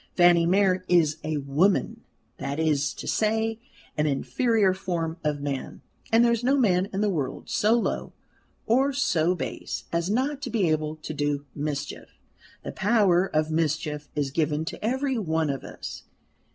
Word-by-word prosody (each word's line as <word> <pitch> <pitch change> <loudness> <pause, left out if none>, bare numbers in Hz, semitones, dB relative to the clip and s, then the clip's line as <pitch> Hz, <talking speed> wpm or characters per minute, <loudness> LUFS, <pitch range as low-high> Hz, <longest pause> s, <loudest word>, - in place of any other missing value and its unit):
Fanny 175 -1 +5
Mere 185 0 +3
is 160 -4 +3
a 155 -1 -1
woman 145 +8 +1 0.4
that 140 +2 -4
is 150 -3 +1
to - - -8
say, 220 +1 0 0.4
an 150 0 +1
inferior 205 - +2
form 170 -3 -3
of 150 -1 -1
man; 140 -2 -4 0.3
and 230 +1 +5
there 235 - +4
is 235 0 0
no 270 +3 +3
man 190 -6 +2
in 195 - -2
the 210 - +2
world 145 -7 -4
so 215 +2 +3
low 235 - -1 0.5
or 265 +5 +2
so 180 - +2
base - - -5
as 170 +2 0
not 270 +6 0
to - - -4
be 210 -6 +1
able 155 0 -1
to 155 0 -7
do 145 -1 -1
mischief. 145 0 -5 0.5
The - - -5
power 195 -4 +3
of 155 -1 0
mischief 155 -2 -1
is 145 -2 -1
given 155 +1 0
to 170 - -7
every 260 +2 0
one 160 -5 0
of 135 - -5
us. - - -8
170 Hz, 165 wpm, -26 LUFS, 150-215 Hz, 0.5 s, Fanny